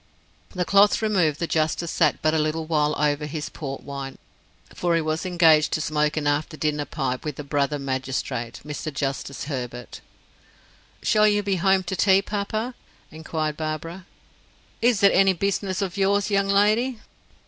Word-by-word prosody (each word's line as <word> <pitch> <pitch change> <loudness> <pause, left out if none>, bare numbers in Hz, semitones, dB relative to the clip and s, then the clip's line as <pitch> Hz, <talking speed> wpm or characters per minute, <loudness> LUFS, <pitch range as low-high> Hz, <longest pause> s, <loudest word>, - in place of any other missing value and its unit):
The 180 -1 0
cloth 200 +2 +5
removed, 180 -9 +2
the 170 - 0
justice 160 +1 -1
sat 155 -6 +1
but 155 0 +3
a 160 - +2
little 155 +1 -1
while 150 -2 +1
over 150 0 +1
his 150 0 -5
port 135 -4 -6
wine, 140 -1 -6 0.6
for 175 -1 0
he 165 - +2
was 155 +3 -2
engaged 160 -4 +4
to - - +1
smoke 150 0 0
an 150 - -1
after 145 +2 -1
dinner 150 -1 -1
pipe 130 -3 -3
with 150 -3 -5
a - - -4
brother 145 +1 0
magistrate, 130 -3 -3
Mr. 150 +1 -5
Justice 140 -1 -3
Herbert. 125 -4 -6 1.0
"Shall 215 0 +4
you 205 0 +2
be 195 -1 0
home 190 +1 +3
to 185 +2 -3
tea, 195 0 +4
papa?" 215 +4 -3 0.4
inquired 155 -1 -3
Barbara. 165 +3 -5 0.7
"Is 235 -4 +2
it 200 - +7
any 195 0 +5
business 195 +1 -1
of 190 0 -4
yours, 200 +1 +1
young 200 0 +2
lady?" 215 +5 +2
160 Hz, 165 wpm, -24 LUFS, 150-195 Hz, 1.0 s, it